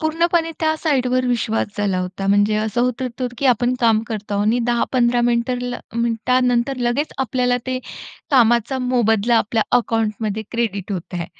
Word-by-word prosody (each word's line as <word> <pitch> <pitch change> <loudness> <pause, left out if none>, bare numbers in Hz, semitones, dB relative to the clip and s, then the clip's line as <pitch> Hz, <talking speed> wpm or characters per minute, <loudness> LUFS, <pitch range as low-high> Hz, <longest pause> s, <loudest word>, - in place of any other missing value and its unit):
पूर्णपणे 330 +1 +1
त्या 315 -1 +1
साइडवर 255 -4 +1
विश्वास 230 -2 0
झाला 195 -3 0
होता. 185 +2 -4
म्हणजे 205 +1 +3
असं 220 +2 -1
होत 250 +1 -1
होतं 250 0 -3
की 280 - +1
आपण 245 +1 +2
काम 225 -2 +3
करतो 210 -2 -4
आहोत 205 +1 0
आणि 235 +3 +2
10-15 240 0 +1
मिनिटं 240 +1 +1 0.4
मिनिटानंतर 245 +2 +1
लगेच 245 +5 -1
आपल्याला 250 -1 +1
ते 255 0 -1 0.5
कामाचा 240 0 +3
मोबदला 235 -2 +2
आपल्या 220 0 0 0.2
अकाउंटमध्ये 220 -2 -2
क्रेडिट 205 -4 -2
होत 180 0 -6
आहे. 170 -1 -3
235 Hz, 155 wpm, -20 LUFS, 215-255 Hz, 0.5 s, म्हणजे